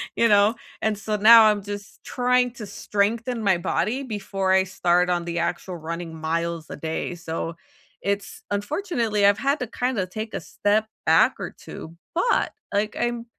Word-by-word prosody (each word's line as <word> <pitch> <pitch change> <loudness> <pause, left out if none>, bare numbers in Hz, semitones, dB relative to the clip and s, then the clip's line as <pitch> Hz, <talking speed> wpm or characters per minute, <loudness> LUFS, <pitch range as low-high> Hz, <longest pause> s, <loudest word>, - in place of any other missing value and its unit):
You 230 - +3
know, 205 +2 +5 0.3
and 220 -1 0
so 210 +1 -2
now 225 +2 +9
I'm 210 -1 +4
just 205 0 -8
trying 250 0 +2
to 235 -3 -8
strengthen 220 +4 -1
my 190 -3 +3
body 235 +9 -1
before 195 -5 -2
I 190 0 +5
start 180 -1 +1
on 175 -1 0
the 170 0 -2
actual 175 +2 -2
running 165 0 -6
miles 165 +1 -2
a - - -7
day, 160 +3 -3
so 165 0 -5 0.4
it's 200 0 -3
unfortunately, 220 - 0
I've 200 +1 +4
had 275 +5 +1
to 250 - -3
kinda 245 -4 -1
take 220 +4 -6
a - - -2
step 210 +2 0 0.2
back - - +5
or - - -5
2, 165 +1 -10 0.2
but, 470 +8 +1 0.2
like, 210 +1 0
I'm 240 -1 -1
205 Hz, 170 wpm, -24 LUFS, 175-230 Hz, 0.4 s, now